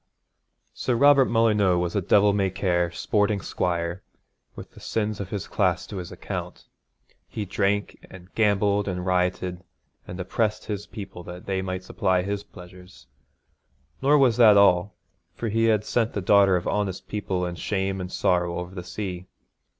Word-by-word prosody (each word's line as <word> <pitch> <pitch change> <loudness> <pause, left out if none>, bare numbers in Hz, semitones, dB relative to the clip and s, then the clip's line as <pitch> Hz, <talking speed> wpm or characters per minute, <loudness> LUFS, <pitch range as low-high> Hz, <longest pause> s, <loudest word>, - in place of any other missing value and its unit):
Sir 125 - -1
Robert 140 +1 +6
Molyneux 105 -5 +3
was 85 -1 -2
a 100 - +2
devil 100 +3 +4
may 100 -1 +1
care, 90 -2 0
sporting 105 +4 0
squire, 85 0 -2 0.5
with - - -10
the - - -15
sins 110 -1 -2
of 100 -2 -5
his 100 -2 -4
class 90 -4 0
to 100 - -8
his 90 -2 -6
account. - - -6 0.6
He 105 - -5
drank, 100 +1 -1
and 95 0 -14
gambled, 105 -1 +2
and 90 -2 -3
rioted, 90 -1 -1 0.4
and 90 - -7
oppressed 105 +4 -1
his 105 -1 -5
people 100 -5 -8
that 90 +1 -9
they 95 -1 -1
might 95 0 -4
supply 95 -1 0
his 100 +1 -3
pleasures; 90 -3 -14 1.0
nor 145 +2 +4
was 125 -5 +3
that 110 -4 +7
all, 100 -1 +4 0.4
for 115 - -3
he 115 +2 +1
had 110 -2 +2
sent 115 -1 0
the - - -2
daughter 100 0 +5
of 90 - -2
honest 100 -3 -2
people 95 -3 -2
in 90 - -4
shame 95 +2 -2
and 90 0 -6
sorrow 85 -1 0
over 90 +1 -6
the 90 -2 -6
sea. 90 -1 -6
95 Hz, 165 wpm, -25 LUFS, 90-105 Hz, 1.0 s, that